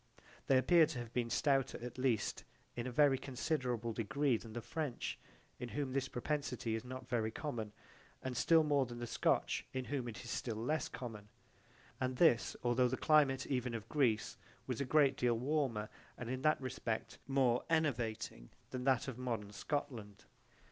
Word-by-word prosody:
They 135 - +5
appear 160 +5 +6
to 155 -4 -5
have 120 -1 -6
been 120 -2 0
stouter 135 +1 +2
at 125 +1 -7
least 125 -5 0 0.3
in 120 +1 -3
a - - -3
very 135 0 +4
considerable 125 -4 -1
degree 135 +4 +1
than 110 0 -6
the 120 - -4
French 140 +1 -3 0.4
in 125 -1 -4
whom 130 +3 -2
this 135 0 0
propensity 125 -3 -2
is 110 0 -2
not 130 0 -7
very 115 -3 0
common 115 -5 -4 0.5
and 130 -1 -3
still 160 +5 +5
more 145 -3 +2
than 120 0 -7
the 120 - -4
Scotch - - +1
in 130 -1 -2
whom 135 -3 -2
it 115 +1 -6
is 120 - -6
still 115 -3 -2
less 125 +9 -1
common, 105 -4 -7 0.7
and 130 0 -1
this 140 -8 +4
although 125 +1 +3
the 130 +1 -1
climate 145 -4 +4
even 125 -3 -1
of 110 -1 -6
Greece 120 -7 +1 0.3
was 130 0 -2
a - - 0
great 140 -1 +4
deal 120 -2 +2
warmer 130 -5 0 0.3
and 125 -1 -4
in 130 0 -2
that 155 +2 +3
respect 115 -3 -3
more 130 -3 +3
enervating 120 - 0 0.2
than 125 0 -4
that 135 0 +3
of 130 -2 -5
modern 115 -5 -3
Scotland. 110 -3 -4
125 Hz, 175 wpm, -36 LUFS, 115-140 Hz, 0.7 s, appear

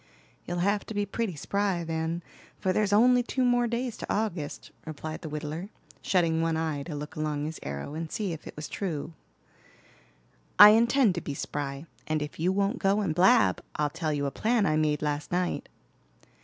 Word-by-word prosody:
"You'll 175 - -2
have 205 0 +1
to 220 - -6
be 205 0 +1
pretty 200 -2 -3
spry, 195 +3 -1
then, 165 +1 -2 0.3
for 185 - 0
there's 210 0 +1
only 245 +4 +5
two 255 +1 -1
more 245 -1 +3
days 235 0 -2
to - - -5
August," 195 -9 -3
replied 155 0 -6
the 160 - -6
whittler, 155 +5 -5 0.3
shutting 165 -4 +2
one 165 -1 +1
eye 160 -3 -1
to 150 +1 -6
look 150 +1 -7
along 150 -1 -2
his 155 +1 -5
arrow 70 - -5
and 160 0 -5
see 200 -5 -2
if 160 - -9
it - - -9
was 150 0 -6
true. 165 -5 -4 1.4
"I 205 +2 +12
intend 235 0 +4
to 175 - -4
be 140 - -5
spry, 140 +1 -4 0.2
and 155 -1 0
if 150 - -8
you 175 +3 +2
won't 200 +5 0
go 200 +1 +2
and 185 -6 0
blab, 155 - +4
I'll 150 -1 0
tell 160 -1 -2
you 145 -1 -1
a 140 - -1
plan 225 - +1
I 155 - +2
made 150 -1 +1
last 145 0 -2
night." 180 0 -1
165 Hz, 195 wpm, -28 LUFS, 150-205 Hz, 1.4 s, I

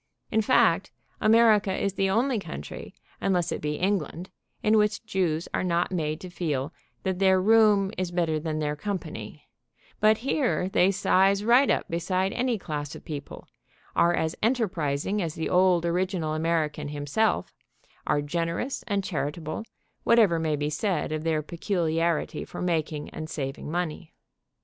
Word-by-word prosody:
In 220 - +3
fact, 255 +4 +3 0.3
America 215 -2 +5
is 195 0 -1
the 195 0 +1
only 235 +4 +1
country, 70 - -8 0.3
unless 175 -3 +1
it - - -3
be 150 0 -2
England, 180 -1 -2 0.3
in 215 +1 +4
which 210 +2 0
Jews 175 -6 -1
are - - 0
not 175 0 0
made 155 -3 -2
to 185 - -7
feel 150 -4 -2 0.3
that 190 -1 -1
their 190 -1 +4
room 210 -1 +4
is 185 -1 -1
better 170 -3 0
than 155 0 -3
their 150 -1 -1
company, 200 +4 -6 0.5
but 215 0 +5
here 265 -10 +1
they 190 -1 +4
size 195 +1 +3
right 245 +5 +5
up - - +1
beside 185 +3 -1
any 250 -2 0
class 150 -5 -5
of - - -12
people, 145 -3 -7 0.5
are 170 0 +4
as 160 -1 -1
enterprising 200 - 0
as 165 -3 -3
the 160 - -2
old 180 -2 +4
original 175 -2 -1
American 155 -2 -1
himself, 145 +9 0 0.5
are 145 - +1
generous 170 - -2
and 200 -3 0
chari 150 -6 -2
table, 155 +5 -6 0.4
whatever 215 -8 +4
may 160 -2 0
be 145 +1 -2
said 180 -2 -1
of 155 0 -2
their 160 -2 0
peculiarity 170 -1 -1
for - - -9
making 160 -4 -2
and 155 0 -6
saving 135 -1 -5
money. 170 -1 -4
175 Hz, 155 wpm, -26 LUFS, 155-200 Hz, 0.5 s, America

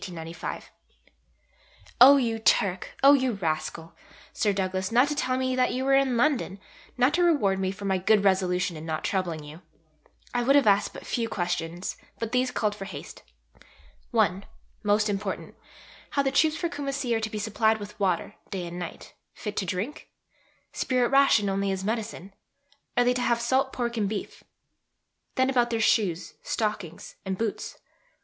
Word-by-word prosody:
Oh 275 +3 +10
you 230 -4 0
Turk, 190 -4 +1
oh 280 +1 +9
you 260 -3 +2
rascal, 165 -2 -3 0.4
Sir 210 - +1
Douglas, 190 0 -2
not 250 +4 +5
to - - 0
tell 255 -3 0
me 260 0 0
that 255 0 +2
you 260 +1 -2
were 275 - +3
in 270 -3 +3
London, 240 -7 +1 0.4
not 255 +4 +3
to 350 +1 +3
reward 240 - +3
me 190 -1 0
for 195 +1 -8
my 190 -1 +1
good 205 +2 +3
resolution 185 -2 +1
in 155 - -8
not 160 -1 -3
troubling 175 -5 -2
you. 150 +3 -11 0.7
I 245 - +1
would 270 +4 +4
have 285 - +5
asked 205 0 +3
but - - -9
few 230 -2 -2
questions, 175 -2 -3 0.2
but 230 -1 -4
these 250 +1 +2
called 210 -4 0
for 195 -2 -7
haste. - - -9 0.9
(i.) 185 +3 +2 0.4
Most 210 +1 +2
important: 200 -2 -3 0.6
How 280 - +1
the 270 - +1
troops 310 +3 +3
for 345 - -1
Kumassi 275 -5 -2
are - - +1
to 220 0 -3
be 215 - -5
supplied 220 +1 +1
with 205 0 -10
water, 185 -4 0 0.2
day 185 -3 -4
and 175 +1 -6
night, 175 -2 -8 0.2
fit 210 -3 -6
to 190 - -1
drink? 200 - -4 0.6
Spirit 250 -2 +1
ration 275 -7 +4
only 195 0 0
as 190 0 -3
medicine? 210 -3 -4 0.6
Are 245 - +5
they 245 0 +3
to 250 - -2
have 235 -1 +2
salt 265 +3 +1
pork 235 -1 -3
and 205 -3 0
beef? 210 -2 -6 0.9
Then 260 -1 +3
about 245 -2 +2
their 230 -1 -1
shoes, 195 -6 +1
stockings, 205 -7 -3
and 190 -1 -3
boots? 220 -1 -3
215 Hz, 170 wpm, -27 LUFS, 190-255 Hz, 0.9 s, Oh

